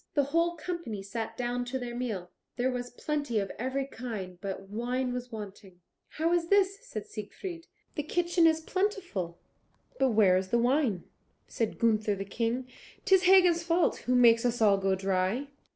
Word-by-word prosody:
The 285 - +4
whole 340 +1 +2
company 315 - -5
sat 225 +2 -5
down 245 0 -1
to 255 +2 -3
their 245 -2 -5
meal. 215 -8 -4 0.2
There 255 +1 +1
was 245 -1 -4
plenty 285 -2 -2
of 195 -2 -1
every 260 +3 -1
kind, 215 -9 -6
but 195 -1 -5
wine 245 +4 -2
was 250 0 -5
wanting. 200 -4 -9 0.3
"How 325 +2 0
is 340 -1 +1
this?" 395 +1 +3
said 215 -2 -6
Siegfried: 330 - -7 0.3
"the 295 - -2
kitchen 345 +2 +2
is 320 0 +2
plentiful; 360 - -2 0.6
but 265 -1 +4
where 210 -5 +5
is 185 0 -2
the 235 - +2
wine?" 240 - +2 0.4
Said 225 -2 -2
Gunther 215 -2 +2
the 195 0 -5
King, 230 +5 -2 0.4
"'Tis 380 -1 +5
Hagen's 360 -2 +6
fault, 335 +1 +2
who 250 - 0
makes 235 -2 +6
us 245 -1 0
all 205 -3 +5
go 195 0 +1
dry." 195 +8 0
245 Hz, 170 wpm, -29 LUFS, 210-315 Hz, 0.6 s, Hagen's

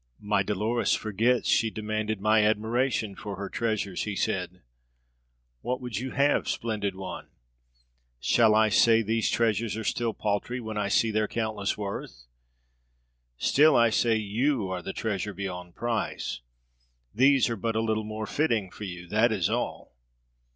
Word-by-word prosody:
"My 105 -1 +1
Dolores 105 +4 0
forgets 115 +4 +1
she 110 - +3
demanded 110 0 -3
my 110 +1 +4
admiration 110 +1 0
for 100 +1 -7
her 100 +1 -5
treasures," 110 -5 -2
he 105 -2 -3
said. - - -2 1.0
"What 125 - -2
would 125 -5 -4
you 130 +2 -4
have, 140 +2 +1
splendid 105 -4 -2
one? 95 0 -7 0.9
Shall 110 - +4
I 110 0 +4
say 115 +2 +5
these 110 +1 0
treasures 110 -1 0
are 110 - -4
still 115 0 -1
paltry, 105 +4 -2
when 110 -2 -6
I 105 -1 0
see 110 +3 +2
their 110 0 +1
countless 110 -3 -2
worth? 100 - -6 1.1
Still 150 - +4
I 115 -1 +5
say 115 +1 +2
you 110 +1 0
are 90 -1 -3
the 90 - -5
treasure 105 -2 -3
beyond 90 -2 -6
price. 115 - -2 0.7
These 135 +2 +4
are - - -1
but 115 +2 -2
a - - +2
little 110 -1 0
more 110 0 -5
fitting 115 -9 0
for 105 - -8
you. 90 -2 -7
That 110 +5 +3
is 100 -2 0
all. 120 +2 -3
110 Hz, 155 wpm, -27 LUFS, 100-115 Hz, 1.1 s, say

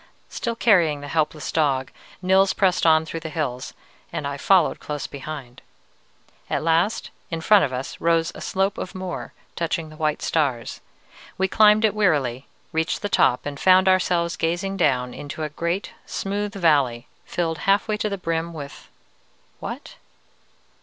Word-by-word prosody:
Still 235 -2 -3
carrying 170 -11 +3
the 145 - -7
helpless 155 0 -1
dog, 135 -4 +1 0.3
Nils 190 +1 +4
pressed 185 -4 +2
on 160 0 +5
through 165 +1 -5
the 160 0 -6
hills, 135 -6 -4 0.4
and - - -4
I 140 0 -2
followed 180 +4 +3
close 150 -1 -5
behind. 140 -3 -8 0.9
At - - -1
last, 165 +6 +1 0.2
in 165 - -3
front 200 +2 +5
of 135 - -5
us, 130 +1 -5
rose 165 0 +2
a - - -10
slope 195 +1 -1
of 185 - -6
moor 185 -2 -5 0.2
touching 165 -1 -2
the 155 - -12
white 155 -1 -1
stars. 135 -7 -1 0.6
We 190 - +2
climbed 215 +2 +5
it 210 - +2
wearily, 145 - +1 0.2
reached 160 +5 -1
the 205 - -1
top, 125 - +3
and 145 -1 -5
found 185 0 +5
ourselves 180 -2 +2
gazing 175 +4 -1
down 125 -8 +1
into 145 +2 -6
a 155 - -2
great, 170 +6 -3 0.2
smooth 205 +1 -3
valley, 140 -10 +2 0.2
filled 165 -2 -2
half 200 +2 +3
way 215 -1 0
to 210 - -1
the 200 - -3
brim 165 -1 -2
with 145 -3 -9 0.7
what? - - -7
165 Hz, 160 wpm, -23 LUFS, 145-190 Hz, 0.9 s, on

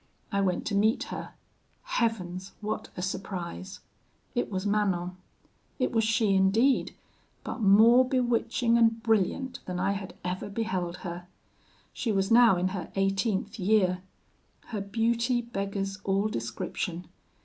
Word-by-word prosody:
I 200 -1 +1
went 185 -2 0
to 210 - -2
meet 215 +3 +3
her. - - -7 0.5
Heavens! 190 -5 -2
what 215 0 -4
a 180 - -3
surprise! 190 0 -5 0.5
"It 245 - -1
was 190 0 -3
Manon. 190 -4 0 0.6
It 255 - 0
was 225 -1 +2
she 220 -2 +2
indeed, 210 +8 +3 0.5
but - - -5
more 220 +5 +7
bewitching 240 -2 +1
and 225 0 +3
brilliant 235 +4 +1
than 180 -1 -3
I 190 +2 +1
had 195 -1 -5
ever 180 +3 -3
beheld 190 -5 -2
her. 175 0 -6 0.7
She 230 - -1
was 195 +1 0
now 230 -5 +7
in 180 +1 +1
her 185 -3 -5
eighteenth 195 +2 0
year. 185 -2 +2 0.7
Her 215 -4 -3
beauty 230 +4 +1
beggars 195 -3 -3
all 195 +2 +1
description. 165 - -4
200 Hz, 135 wpm, -28 LUFS, 185-225 Hz, 0.7 s, more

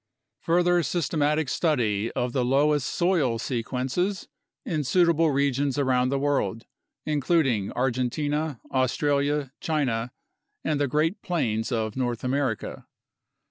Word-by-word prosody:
Further 175 +1 +3
systematic 150 -1 0
study 115 - 0
of 125 0 -2
the 130 - +1
loess 145 +3 +2
soil 165 -8 +1
sequences 130 - -2 0.4
in 155 -3 -1
suitable 165 +2 +3
regions 140 0 +1
around 130 -2 +2
the 140 - 0
world, 135 -7 -1 0.4
including 140 - +1
Argentina, 135 +3 -1
Australia, 140 +2 +1
China, 125 -7 -1 0.5
and 150 -2 0
the 145 - +2
Great 160 - 0
Plains 115 - -1
of 110 -3 -1
North 120 -3 -2
America. 130 -3 -2
140 Hz, 110 wpm, -26 LUFS, 125-155 Hz, 0.5 s, Further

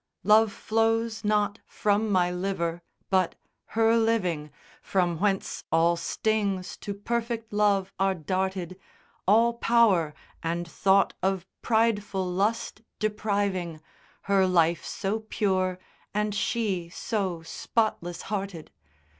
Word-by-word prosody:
in. 200 - -6
Love 215 0 +6
flows 225 +1 0
not 210 0 +1
from 210 +1 +1
my 180 -2 +3
liver 180 -2 -2 0.3
but 185 -2 +2 0.4
her 225 0 +5
living, 185 -10 +1 0.3
From 175 -4 0
whence 195 -1 0
all 165 +1 +4
stings 200 +1 -1
to 200 - -5
perfect 230 +1 -3
love 200 -2 +2
are 195 0 +2
darted 185 +2 -2 0.5
All 230 +4 +5
power, 225 -10 +3 0.3
and 170 +1 -2
thought 195 +3 +3
of 190 -1 0 0.2
prideful 215 -4 +1
lust 200 +4 -1 0.2
depriving 200 -6 -1 0.4
Her 195 -1 +3
life 170 -2 +3
so 205 +2 -2
pure 185 -3 +1 0.4
and 210 0 0
she 195 -5 -1
so 185 -3 -2
spotless 175 -1 -2
hearted. 195 -5 -4
195 Hz, 115 wpm, -27 LUFS, 180-215 Hz, 0.5 s, Love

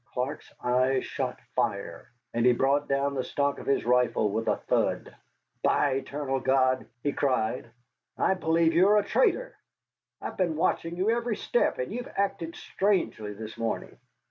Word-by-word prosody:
Clark's 125 +3 -3
eyes 130 +2 +2
shot - - -3 0.2
fire, - - -2 0.2
and 115 - +1
he 125 0 +6
brought 140 +4 +2
down 140 +1 +1
the 130 -2 -1
stock 140 +1 -1
of - - -10
his 140 - +1
rifle 125 -4 +2
with 110 +2 -2
a - - +3
thud. - - -1 0.5
"By 145 - +3
the 135 - +1
eternal 135 -1 -3
God!" 130 -1 +2 0.2
he 145 - 0
cried, 125 -3 0 0.5
"I - - +3
believe 165 -2 +2
you 180 +4 +5
are 210 +1 +5
a 205 - +2
traitor. - - +1 0.6
I've - - -6
been 175 -4 +1
watching 165 +2 0
you 195 +5 +2
every 235 -1 0
step, 485 - +1
and - - -3
you've 245 +1 -5
acted 170 -4 -1
strangely 185 - -1
this 110 +1 -8
morning." 115 -1 -3
140 Hz, 170 wpm, -28 LUFS, 125-185 Hz, 0.6 s, he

